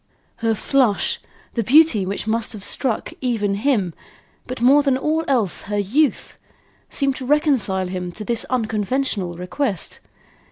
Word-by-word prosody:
Her 225 Hz, -1 st, 0 dB
flush, 245 Hz, -2 st, +1 dB, 0.3 s
the 235 Hz, -, 0 dB
beauty 255 Hz, -6 st, +5 dB
which 200 Hz, +2 st, -3 dB
must 225 Hz, +1 st, 0 dB
have 205 Hz, -3 st, -8 dB
struck 240 Hz, +1 st, -2 dB
even 225 Hz, -6 st, 0 dB
him, 205 Hz, -5 st, 0 dB, 0.5 s
but 255 Hz, 0 st, -5 dB
more 265 Hz, +5 st, +6 dB
than 275 Hz, -2 st, +2 dB
all 310 Hz, +4 st, 0 dB
else 235 Hz, -9 st, +1 dB
her 205 Hz, -, -1 dB
youth, 255 Hz, +10 st, 0 dB, 0.5 s
seemed 275 Hz, -2 st, 0 dB
to 260 Hz, -, -6 dB
reconcile 265 Hz, -11 st, +2 dB
him 180 Hz, -1 st, -4 dB
to 215 Hz, -, -7 dB
this 235 Hz, 0 st, 0 dB
unconventional 220 Hz, -4 st, -1 dB
request. 190 Hz, -, -2 dB
230 Hz, 145 wpm, -21 LUFS, 200-270 Hz, 0.5 s, more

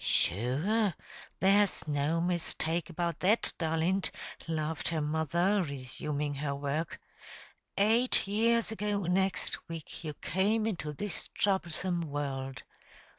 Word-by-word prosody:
"Shure 155 Hz, -, +2 dB, 0.4 s
there's 200 Hz, -2 st, +3 dB
no 150 Hz, +3 st, +1 dB
mistake 170 Hz, -2 st, 0 dB
about 170 Hz, 0 st, -2 dB
that, 210 Hz, +5 st, +3 dB
darlint," 165 Hz, +3 st, +1 dB, 0.4 s
laughed 155 Hz, -1 st, -1 dB
her 165 Hz, -1 st, 0 dB
mother, 160 Hz, +6 st, +2 dB
resuming 145 Hz, 0 st, -3 dB
her 140 Hz, 0 st, -2 dB
work. 145 Hz, +3 st, -2 dB, 0.8 s
"Eight 225 Hz, +5 st, +4 dB
years 230 Hz, +3 st, +2 dB
ago 210 Hz, -2 st, -1 dB
next 190 Hz, 0 st, 0 dB
week 165 Hz, 0 st, -7 dB
you 150 Hz, -2 st, -4 dB
came 210 Hz, +7 st, +1 dB
into 170 Hz, -9 st, -2 dB
this 175 Hz, +5 st, -2 dB
throublesome 180 Hz, -2 st, +1 dB
world. 140 Hz, -3 st, -3 dB
170 Hz, 110 wpm, -31 LUFS, 150-195 Hz, 0.8 s, Eight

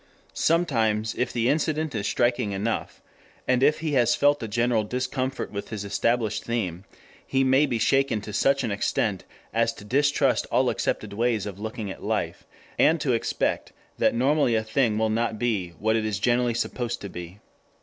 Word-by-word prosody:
Sometimes, 115 Hz, -10 st, +1 dB
if 125 Hz, -, -1 dB
the 120 Hz, -1 st, 0 dB
incident 155 Hz, +1 st, 0 dB
is 105 Hz, -2 st, -2 dB
striking 120 Hz, -1 st, +1 dB
enough, 105 Hz, +4 st, -3 dB, 0.4 s
and 130 Hz, 0 st, +2 dB
if 150 Hz, +3 st, +3 dB
he 160 Hz, -2 st, -1 dB
has 120 Hz, -4 st, +3 dB
felt 145 Hz, +2 st, +3 dB
a 115 Hz, -, -3 dB
general 115 Hz, 0 st, +1 dB
discomfort 130 Hz, +3 st, -3 dB
with 100 Hz, -1 st, -6 dB
his 105 Hz, -2 st, -5 dB
established 110 Hz, +2 st, 0 dB
scheme, 100 Hz, -6 st, -3 dB, 0.4 s
he 135 Hz, 0 st, +1 dB
may 135 Hz, +3 st, +4 dB
be 120 Hz, -3 st, -1 dB
shaken 135 Hz, -1 st, +2 dB
to 105 Hz, 0 st, -8 dB
such 135 Hz, +6 st, +2 dB
an 115 Hz, -, -1 dB
extent 100 Hz, -1 st, -1 dB, 0.3 s
as -, -, +2 dB
to 100 Hz, -, -13 dB
distrust 140 Hz, +6 st, +2 dB
all -, -, +3 dB
accepted -, -, -2 dB
ways 115 Hz, -1 st, 0 dB
of 100 Hz, -2 st, -7 dB
looking 110 Hz, -1 st, -5 dB
at -, -, -10 dB
life, -, -, -3 dB, 0.3 s
and 160 Hz, +1 st, +4 dB
to 140 Hz, -5 st, +1 dB
expect 115 Hz, -, -1 dB, 0.3 s
that -, -, +3 dB
normally 135 Hz, 0 st, +2 dB
a 110 Hz, -, +1 dB
thing 110 Hz, 0 st, +1 dB
will 110 Hz, 0 st, +1 dB
not 115 Hz, 0 st, 0 dB
be 105 Hz, -6 st, -1 dB
what 110 Hz, +1 st, +1 dB
it 110 Hz, -, +1 dB
is 110 Hz, -2 st, -1 dB
generally 120 Hz, +2 st, +1 dB
supposed 120 Hz, 0 st, -2 dB
to 100 Hz, -, -5 dB
be. 90 Hz, +1 st, -8 dB
115 Hz, 180 wpm, -25 LUFS, 105-130 Hz, 0.4 s, may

